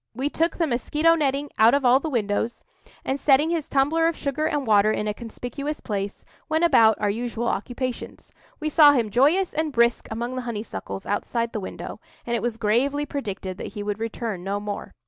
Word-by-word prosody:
We 270 +4 -2
took 330 +1 0
the 335 - +2
mosquito 300 +5 +2
netting, 285 -2 0
out 225 +4 +6
of 280 -2 0
all 250 +2 +6
the 315 - -4
windows, 225 -2 -1 0.4
and, 270 +1 -1
setting 295 +4 +4
his 330 -4 -2
tumbler 305 +4 +2
of 330 - -1
sugar 295 +2 -1
and 295 -3 -1
water 210 -1 +4
in 210 0 -2
a 210 - 0
conspicuous 245 +6 -6
place, 200 -1 -4 0.2
went 315 +2 +1
about 230 -10 +5
our 205 -1 +1
usual 235 +1 -3
occupations. 245 +4 -4 0.3
We 310 - -3
saw 300 -1 +7
him 230 -6 0
joyous 310 - +3
and 310 0 -1
brisk 235 -2 +2
among 235 +3 -4
the 255 - -2
honeysuckles 225 -4 -6
outside 230 +3 -2
the 215 - -2
window, 190 - -7 0.3
and 235 - -1
it - - -1
was 240 -2 -2
gravely 255 +7 +1
predicted 200 -9 -5
that - - -6
he 205 -2 -5
would 205 0 -3
return 225 -4 -4
no 200 +2 -2
more. 205 0 -6
245 Hz, 200 wpm, -24 LUFS, 220-290 Hz, 0.4 s, saw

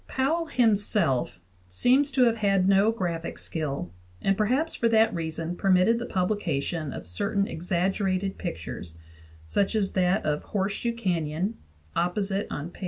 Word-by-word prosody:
Powell 320 +6 0
himself 205 - +2 0.3
seems 255 - +3
to 260 - +4
have 230 -2 +3
had 195 -3 +2
no 200 +3 +5
graphic 170 -6 -3
skill, 140 - -4 0.3
and 195 - +1
perhaps 255 +11 +1
for 230 - +1
that 225 0 +4
reason 165 0 -3
permitted 190 +5 +3
the 240 - -4
publi 190 +3 0
cation 155 -2 -2
of - - -7
certain 200 - 0
exaggerated 185 +3 -1
pictures, 80 0 -6 0.5
such 200 - 0
as 200 -3 +1
that 185 +2 +1
of 150 -1 0
Horse 195 -1 -1
shoe 235 +2 -2
Canyon 180 -1 -2 0.4
(opposite 195 +3 -1
p. 160 +4 -6
195 Hz, 145 wpm, -27 LUFS, 165-220 Hz, 0.5 s, no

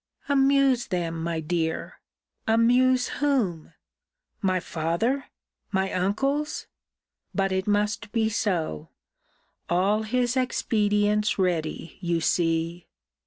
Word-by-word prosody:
Amuse 275 -3 +3
them, 165 -4 -2
my 165 0 -2
dear! 160 0 -2 0.5
Amuse 245 +3 +4
whom? 230 - 0 0.7
My 185 -3 +2
father! 175 - -1 0.5
my 190 -1 0
uncles! 275 +11 0 0.7
But 195 -1 +1
it 190 +1 -1
must 210 +1 0
be 225 -2 +1
so! 180 - -1 0.8
All 195 +5 +2
his 245 +3 0
expedients 210 -4 +1
ready, 170 -3 -2
you 170 -2 0
see! 165 +1 0
205 Hz, 95 wpm, -26 LUFS, 170-240 Hz, 0.8 s, Amuse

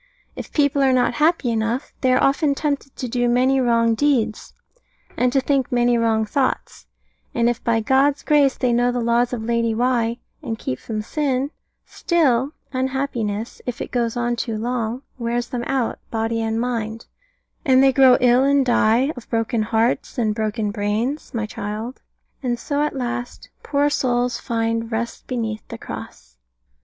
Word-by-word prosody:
If - - -8
people 285 -2 +2
are 265 -1 +4
not 250 -1 +2
happy 310 -6 +3
enough, 225 +4 -2
they 255 - +3
are 255 - +3
often 280 +1 +2
tempted 280 -2 -2
to 255 - -4
do 245 0 0
many 260 +2 +3
wrong 230 -2 +3
deeds, 240 -4 0 0.6
and 250 0 +2
to 270 - +3
think 270 -1 0
many 240 0 +3
wrong 225 -1 +2
thoughts: 260 +5 -2 0.5
and 235 0 +2
if 240 - -1
by 230 -1 +2
God's 275 +5 +2
grace 290 -3 +3
they 250 -2 +1
know 245 +1 +2
the 245 - -2
laws 235 +1 +2
of 240 -3 -3
Lady 230 -1 0
Why, 235 -1 +1 0.2
and 230 -7 -4
keep 130 - -4
from 215 -2 -4
sin, 275 +1 -1 0.3
still 285 -5 +1 0.2
unhappiness, 255 -5 -2
if 245 -1 -3
it - - -5
goes 235 -2 -1
on 240 0 0
too 230 -2 -3
long, 240 +2 -2 0.2
wears 240 0 -2
them 245 -1 -3
out, 265 -4 -1
body 225 0 -1
and 225 0 -1
mind; 230 -2 -3 0.6
and 260 -1 +5
they 270 -1 +5
grow 260 -1 +6
ill 250 +1 +5
and 280 0 +3
die, 240 +3 +3
of 245 - -11
broken 225 0 0
hearts, 225 +4 0
and 220 -3 +1
broken 215 -1 -2
brains, 215 +8 -2
my 225 -2 -2
child; 215 +4 -6 0.4
and 245 -3 -1
so 285 +4 -2
at 300 -1 -1
last, 245 -1 -4
poor 285 0 +1
souls, 245 -4 0
find 230 0 -2
"Rest 230 +1 -4
beneath 225 -4 -3
the - - -7
Cross." - - -9
240 Hz, 170 wpm, -21 LUFS, 230-265 Hz, 0.6 s, grow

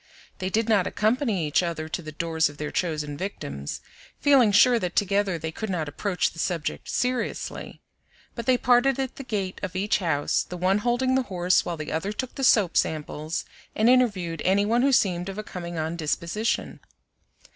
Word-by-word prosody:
They 185 -1 -2
did 220 +3 0
not 205 -5 +3
accompany 215 - 0
each 150 - +2
other 165 -3 -3
to 160 - -4
the 155 -2 -8
doors 160 0 0
of 145 - -13
their 150 0 -4
chosen 150 -4 -2
victims, 70 - -5 0.4
feeling 265 -7 +5
sure 235 +4 +6
that 180 -3 -3
together 200 -2 +1
they 160 0 -4
could 220 +6 -5
not 170 -5 -2
approach 180 +4 -1
the 165 - -12
subject 165 -2 -2
seriously; 250 -1 -3 0.5
but 235 0 -7
they 255 -1 +5
parted 250 +1 +3
at 265 -1 -3
the 275 - -6
gate 200 -6 -3
of 190 -2 -5
each 200 +3 +1
house, 160 -6 +1
the 180 - -7
one 185 +3 +2
holding 245 +3 +1
the 265 - +3
horse 180 -1 +2
while 170 -1 -3
the 155 0 -5
other 175 +6 -2
took 250 +4 -4
the 270 - -5
soap 210 -8 +4
samples 155 0 -2 0.3
and 220 - +3
interviewed 190 -11 +1
any 195 +2 +3
one 230 +3 +2
who 275 +2 +3
seemed 180 -6 +2
of 195 - -7
a 215 - -4
coming 175 -4 -7
on 160 +2 -2
disposition. 170 +7 -2
190 Hz, 190 wpm, -25 LUFS, 165-225 Hz, 0.5 s, sure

